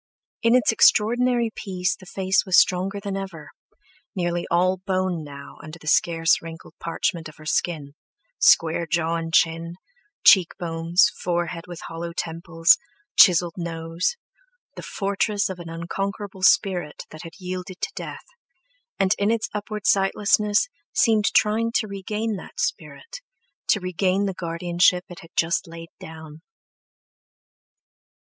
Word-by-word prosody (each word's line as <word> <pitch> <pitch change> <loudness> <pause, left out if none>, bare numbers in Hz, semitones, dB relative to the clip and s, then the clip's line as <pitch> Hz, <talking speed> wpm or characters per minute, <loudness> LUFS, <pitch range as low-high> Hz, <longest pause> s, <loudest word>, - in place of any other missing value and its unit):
In 230 +1 +4
its 250 - +4
extraordinary 235 +2 +3
peace 185 -3 -2
the 185 - -16
face 190 0 +1
was 185 -3 +2
stronger 190 +3 +3
than 200 -1 -5
ever, 190 -6 -7 0.6
nearly 175 -2 -2
all 185 +2 +2
bone 185 -3 -2
now 140 -1 -11
under 155 +1 -10
the 160 - -17
scarce 165 +1 +3
wrinkled 165 0 -10
parchment 165 -1 -2
of 155 - -15
skin—square 165 - 0
jaw 165 -1 0
and 165 0 -5
chin, 165 +1 +1 0.5
cheekbones, 170 0 +4
forehead 175 -1 -2
with 175 -1 -9
hollow 170 +1 -6
temples, 165 0 +2 0.4
chiselled 175 -2 +6
nose—the 170 - -6
fortress 200 0 -1
of 185 -1 -6
an 170 -1 -8
unconquerable 195 +4 -5
spirit 185 -5 +2
that 155 - -10
had 165 -1 -10
yielded 185 0 -6
to - - -2
death, - - -7 0.7
and 195 0 +3
in 200 +1 +2
its 225 -1 0
upward 210 -1 -5
sightlessness 205 - +2 0.3
seemed 220 -6 +3
trying 220 +3 +2
to 220 - 0
regain 210 +2 -3
that 485 - -11
spirit, - - -4 0.5
to 210 - +3
regain 185 +2 0
the 195 - -2
guardianship 175 +1 +1
it 175 - -10
had 165 - -14
just 170 +2 +1
laid 165 0 -10
down. 160 -1 -11
180 Hz, 130 wpm, -23 LUFS, 165-200 Hz, 0.7 s, chiselled